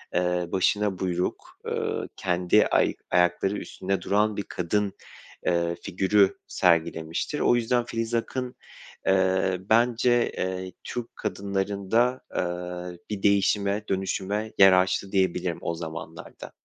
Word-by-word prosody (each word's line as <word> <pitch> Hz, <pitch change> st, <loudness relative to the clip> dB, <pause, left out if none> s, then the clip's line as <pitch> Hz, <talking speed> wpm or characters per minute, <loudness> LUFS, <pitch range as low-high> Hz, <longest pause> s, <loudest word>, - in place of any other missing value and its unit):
eee, 90 Hz, 0 st, +1 dB
başına 100 Hz, 0 st, +1 dB
buyruk, 90 Hz, -1 st, -3 dB
ııı, -, -, -2 dB
kendi 90 Hz, -1 st, +3 dB
ay -, -, +2 dB, 0.2 s
ayakları 90 Hz, +3 st, +2 dB
üstünde 95 Hz, 0 st, -3 dB
duran 105 Hz, +1 st, +1 dB
bir 100 Hz, -, -1 dB
kadın, 100 Hz, +3 st, -1 dB, 0.5 s
eee, 85 Hz, -1 st, +1 dB
figürü 95 Hz, +2 st, +2 dB
sergilemiştir. 85 Hz, -, 0 dB
O -, -, +4 dB
yüzden, 120 Hz, 0 st, +1 dB
Filiz 115 Hz, 0 st, -3 dB
Akın, 125 Hz, +2 st, -3 dB, 0.5 s
eee, 95 Hz, -1 st, +2 dB
bence, 120 Hz, +1 st, +3 dB
eee, 95 Hz, 0 st, -3 dB
Türk 120 Hz, -1 st, -6 dB
kadınlarında, 100 Hz, +5 st, -1 dB
aaa, 90 Hz, 0 st, -3 dB, 0.2 s
bir 105 Hz, -2 st, -4 dB
değişime, 100 Hz, +1 st, +2 dB
dönüşüme 100 Hz, +3 st, -2 dB
yer 95 Hz, -1 st, +8 dB
açtı 95 Hz, +1 st, +1 dB
diyebilirim 90 Hz, -3 st, 0 dB
o 85 Hz, -, -2 dB
zamanlarda. 80 Hz, -1 st, -8 dB
95 Hz, 115 wpm, -26 LUFS, 90-105 Hz, 0.5 s, yer